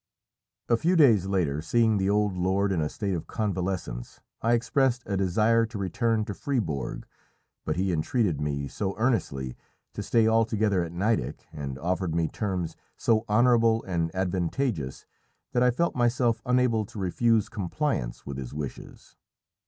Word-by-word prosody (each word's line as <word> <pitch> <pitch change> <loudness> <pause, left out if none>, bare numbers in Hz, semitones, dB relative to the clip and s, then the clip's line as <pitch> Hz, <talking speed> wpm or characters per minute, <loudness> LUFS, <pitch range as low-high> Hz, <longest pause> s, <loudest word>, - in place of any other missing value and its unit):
A 115 - +3
few 175 +8 +2
days 115 - +5
later, 85 -7 0
seeing 110 +4 +2
the 95 0 +1
old 105 -1 +2
lord 95 +2 +1
in 90 -4 +1
a 75 - 0
state 100 -2 -3
of 85 - -4
convalescence, 95 - -3 0.2
I 115 +1 +2
expressed 125 +1 +1
a 100 - -2
desire 105 +5 +3
to 115 -1 -7
return 110 +4 0
to 105 - -4
Fribourg, 90 - -2 0.6
but 75 - -1
he 95 +1 0
entreated 85 - 0
me 70 -1 -2
so 95 +5 -3
earnestly 70 - 0 0.4
to - - -4
stay 115 -1 +3
altogether 110 -3 +2
at 85 - -6
Nideck, 90 - -1
and 70 -4 -5
offered 90 +2 -1
me 85 -1 +1
terms 90 -4 -3 0.2
so 115 0 +2
honourable 115 0 +4
and 85 -3 -1
advantageous, 90 - -1 0.5
that 125 - +1
I 125 - +5
felt 170 +8 0
myself 120 -1 +2
unable 125 -3 +3
to - - -12
refuse 110 +3 +2
compliance 100 - -2
with 70 -1 -5
his 65 0 -7
wishes. 75 -2 -8
100 Hz, 155 wpm, -27 LUFS, 85-115 Hz, 0.6 s, days